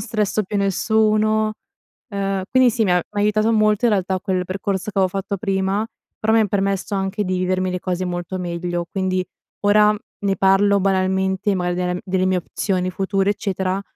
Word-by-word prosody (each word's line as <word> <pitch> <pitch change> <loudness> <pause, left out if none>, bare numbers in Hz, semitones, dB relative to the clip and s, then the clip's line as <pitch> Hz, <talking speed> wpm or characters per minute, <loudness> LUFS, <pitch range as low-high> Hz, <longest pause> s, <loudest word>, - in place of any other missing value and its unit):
stresso 215 -2 -1
più 205 +1 -4
nessuno, 215 +2 +2 0.6
uhm, 195 -1 -2
quindi 255 -1 +5
sì 225 0 0
mi 190 - +2
ha 180 - +4
m'ha 205 +4 -4
aiutato 215 +2 +2
molto 215 0 +3
in 230 - +4
realtà 190 -2 0
quel 185 -2 -1
percorso 195 +2 -3
che 195 - -1
avo 190 - +4
fatto 195 +1 -3
prima, 195 +1 0 0.4
però 220 - +1
mi 225 - +5
ha 215 - +3
permesso 195 0 -1
anche 195 +2 -1
di 185 -1 -1
vivermi 185 0 0
le 180 - -2
cose 185 0 -2
molto 175 +1 -4
meglio, 175 -1 -3
quindi 185 -1 -1 0.4
ora 210 +1 +4 0.2
ne 195 -1 0
parlo 195 +2 +4
banalmente, 190 +1 +1
magari, 180 -1 -1 0.2
del 180 - -3
delle 185 -1 0
mie 185 -1 +2
opzioni 185 +1 -2
future, 195 +1 0
eccetera, 190 -2 -2
195 Hz, 180 wpm, -21 LUFS, 185-210 Hz, 0.6 s, quindi